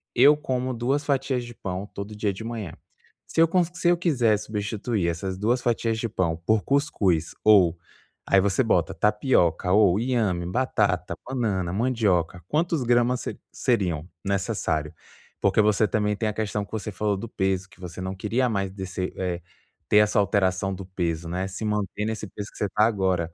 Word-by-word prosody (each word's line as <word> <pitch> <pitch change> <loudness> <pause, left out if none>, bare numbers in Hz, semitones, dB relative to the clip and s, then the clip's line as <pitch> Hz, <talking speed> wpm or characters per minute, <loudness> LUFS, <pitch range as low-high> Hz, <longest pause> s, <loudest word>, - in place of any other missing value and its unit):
eu 140 +5 +7
como 130 -3 -2
duas 135 +5 0
fatias 135 -3 0
de 120 - -9
pão 95 0 -4
todo 100 +2 -6
dia 105 -2 -1
de 110 - -8
manhã. 115 -7 -5 0.5
Se 165 - +4
con 180 +1 +3 0.2
eu 175 0 +5
quisesse 120 - +2
substituir 105 -2 -2
essas 95 +2 -3
duas 120 +5 +1
fatias 115 -2 0
de 115 - -1
pão 85 -5 -1
por 110 -1 +2
cuscuz" 105 - +1
ou 95 -6 +5 0.5
aí 100 - +5
você 100 +6 +2
coloca 85 -7 +1
"tapioca, 105 - +2 0.3
inhame, 110 -8 0
batata, 90 -5 0
banana, 105 -9 -1
mandioca, 100 -7 +1
quantos 160 -2 0
gramas 120 +1 +2 0.3
seriam 90 - 0 0.2
necessários?" 95 -6 -1 0.5
Porque 100 +2 +2
você 105 0 +3
também 105 +1 0
tem 110 +1 -1
a - - -3
questão 105 -1 -2
que - - -26
você 110 -1 -4
falou 100 +1 -1
do 115 +4 -6
peso, 95 -1 -1
que 105 - -21
você 90 0 -8
não 95 +1 -4
queria 115 +6 0
mais 100 -3 -1
descer 95 -1 -4
eh, 90 -2 -2 0.5
ter 105 - +5
essa 105 +1 +4
alteração 95 -1 +1
do 95 0 -7
peso, 85 -3 -3
né? 90 +2 -2
Se 100 +3 -5
manter 105 0 -1
nesse 110 -1 -3
peso 105 +2 -7
em - - -14
que - - -2
está 105 +2 +1
agora. 95 -6 0
105 Hz, 170 wpm, -25 LUFS, 95-115 Hz, 0.5 s, eu